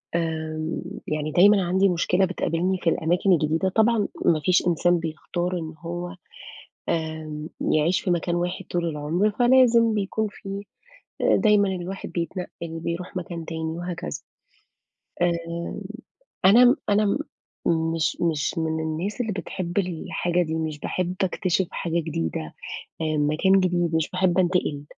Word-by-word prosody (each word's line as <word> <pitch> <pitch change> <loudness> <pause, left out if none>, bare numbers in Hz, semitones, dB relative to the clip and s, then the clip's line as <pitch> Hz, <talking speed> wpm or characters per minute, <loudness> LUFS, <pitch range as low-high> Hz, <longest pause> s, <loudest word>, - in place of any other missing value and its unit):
آمم، 160 -1 -2 0.3
يعني 155 0 -2
دايمًا 195 +4 +6
عندي 190 +3 +3
مشكلة 180 +2 +2
بتقابلني 185 0 0
في 175 - +1
الأماكن 175 +5 +1
الجديدة، 160 +3 +1
طبعًا 220 +2 +3 0.2
ما 160 -2 +4
فيش 180 -1 +3
إنسان 175 +1 +3
بيختار 175 +3 -3
إن 160 -1 -6
هو 175 +2 -5 0.7
آمم، 160 -1 -3
يعيش 155 +4 +2
في 180 - 0
مكان 175 0 0
واحد 175 +1 -2
طول 175 -1 0
العمر، 160 +7 0
فلازم 240 -1 +5
بيكون 215 +1 -1
في 195 0 -7 0.6
دايمًا 210 -2 +4
الواحد 185 +2 -6
بيتنقِّل، 170 -1 -5
بيروح 170 +2 -4
مكان 170 -2 -4
تاني 160 -1 -4
وهكذا. 175 - -4 1.1
آمم، 170 +1 -1 0.6
أنا 230 +6 +8
م 245 +2 +6
أنا 210 +1 +3
م 200 - +2 0.8
مش 160 -3 0
مش 160 -3 0
من 160 -1 -1
الناس 170 +9 -2
اللي 225 -3 -2
بتحب 180 -1 -5
الحاجة 180 -1 0
دي، 160 -1 -3
مش 160 -2 -3
باحب 180 +3 -2
أكتشف 185 0 0
حاجة 170 -1 -1
جديدة 150 - -2 0.6
آآ، 155 -1 0
مكان 155 +7 +3
جديد، 175 -2 +1
مش 160 -1 +1
باحب 185 0 +1
أنتقل. 175 -5 +1
175 Hz, 135 wpm, -24 LUFS, 160-190 Hz, 1.1 s, أنا